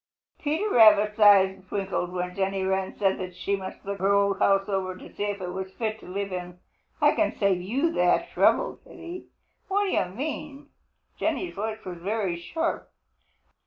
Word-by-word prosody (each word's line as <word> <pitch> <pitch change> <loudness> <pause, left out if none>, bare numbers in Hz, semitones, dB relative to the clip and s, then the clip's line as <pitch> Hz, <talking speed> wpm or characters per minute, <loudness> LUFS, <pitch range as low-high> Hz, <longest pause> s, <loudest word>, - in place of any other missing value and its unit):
Peter 315 +8 -1
Rabbit's 215 -2 +6
eyes 195 -2 +6
twinkled 190 -3 -2
when 180 0 -3
Jenny 195 0 -1
Wren 190 0 -1
said 195 -2 +1
that 185 -1 -6
she 195 +3 -1
must 190 0 -8
look 200 0 -4
her 195 +2 +3
old 200 -1 +2
house 195 0 +3
over 190 -2 -2
to - - -13
see 205 - -3
if 205 0 -3
it 180 -1 -5
was 190 0 -5
fit 220 0 -3
to - - -14
live 195 +1 -4
in. 180 0 -6 0.4
"I - - +5
can - - 0
save 195 -3 +2
you 265 - 0
that - - +2
trouble," - - +2
said - - -15
he. 350 +2 -8 0.4
"What 400 +2 +1
do 390 - -1
you - - +2
mean?" 285 +7 -6 0.5
Jenny's 360 - -1
voice 220 +2 -4
was 180 -2 -6
very 195 -1 -1
sharp. 320 - -3
200 Hz, 185 wpm, -26 LUFS, 190-220 Hz, 0.5 s, Rabbit's